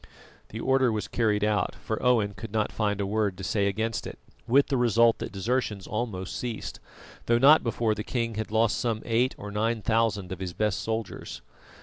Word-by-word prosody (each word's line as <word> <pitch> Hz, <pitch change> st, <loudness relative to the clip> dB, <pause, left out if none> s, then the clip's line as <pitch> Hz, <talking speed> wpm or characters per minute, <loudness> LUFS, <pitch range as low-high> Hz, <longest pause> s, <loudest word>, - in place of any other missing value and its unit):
The 110 Hz, -, -7 dB
order 130 Hz, 0 st, +3 dB
was 110 Hz, -1 st, -2 dB
carried 105 Hz, -3 st, +1 dB
out, 105 Hz, 0 st, +1 dB
for 110 Hz, -, -4 dB
Owen 115 Hz, -5 st, +2 dB
could 100 Hz, +2 st, -8 dB
not 110 Hz, -1 st, 0 dB
find 105 Hz, -2 st, -1 dB
a 100 Hz, -, 0 dB
word 100 Hz, -2 st, 0 dB
to 95 Hz, -, -7 dB
say 100 Hz, 0 st, +1 dB
against 110 Hz, +3 st, -2 dB
it, -, -, -8 dB, 0.3 s
with 135 Hz, +4 st, +5 dB
the 135 Hz, -, -1 dB
result 115 Hz, -2 st, +4 dB
that -, -, -5 dB
desertions 105 Hz, -1 st, -1 dB
almost 105 Hz, -5 st, -4 dB
ceased, 120 Hz, -3 st, -5 dB, 0.5 s
though 115 Hz, -, +4 dB
not 145 Hz, +6 st, +7 dB
before 115 Hz, -1 st, 0 dB
the 105 Hz, 0 st, -4 dB
king 115 Hz, -1 st, -2 dB
had 110 Hz, 0 st, -4 dB
lost 110 Hz, 0 st, +2 dB
some 115 Hz, -3 st, -1 dB
eight 120 Hz, +3 st, +1 dB
or 105 Hz, 0 st, -7 dB
nine 110 Hz, +1 st, -1 dB
thousand 110 Hz, -5 st, +1 dB
of 95 Hz, -, -5 dB
his 90 Hz, -2 st, -4 dB
best 105 Hz, -1 st, 0 dB
soldiers. 110 Hz, -2 st, -4 dB
110 Hz, 200 wpm, -27 LUFS, 105-115 Hz, 0.5 s, not